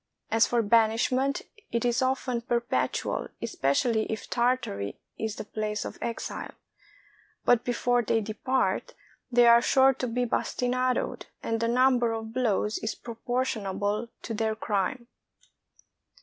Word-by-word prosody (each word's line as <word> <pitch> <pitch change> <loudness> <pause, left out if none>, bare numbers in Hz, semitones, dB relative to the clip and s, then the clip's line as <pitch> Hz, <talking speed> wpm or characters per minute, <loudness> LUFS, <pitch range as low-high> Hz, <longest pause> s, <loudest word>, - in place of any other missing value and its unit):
As 225 +1 +4
for 240 -1 +1
banishment, 230 +5 +2 0.3
it 235 0 0
is 240 +2 +2
often 255 -2 0
perpetual, 235 0 -1
especially 220 - 0
if 220 - -4
Tartary 235 - -1 0.2
is 220 -1 -2
the - - -5
place 215 0 -3
of - - -7
exile; 235 - -4 0.9
but 245 -2 +4
before 245 0 +1
they 225 0 +1
depart, 255 - -1 0.4
they 240 0 +6
are 235 0 +8
sure 265 +1 +5
to 250 0 -3
be 245 +1 0
bastinadoed; 250 +1 -1 0.2
and 225 0 -1
the 230 - +1
number 245 -1 +3
of 225 0 -5
blows 220 -4 0
is 220 - -3
proportionable 230 -3 -2 0.2
to 225 - -4
their 220 0 0
crime. 215 +3 -1
235 Hz, 130 wpm, -28 LUFS, 220-250 Hz, 0.9 s, are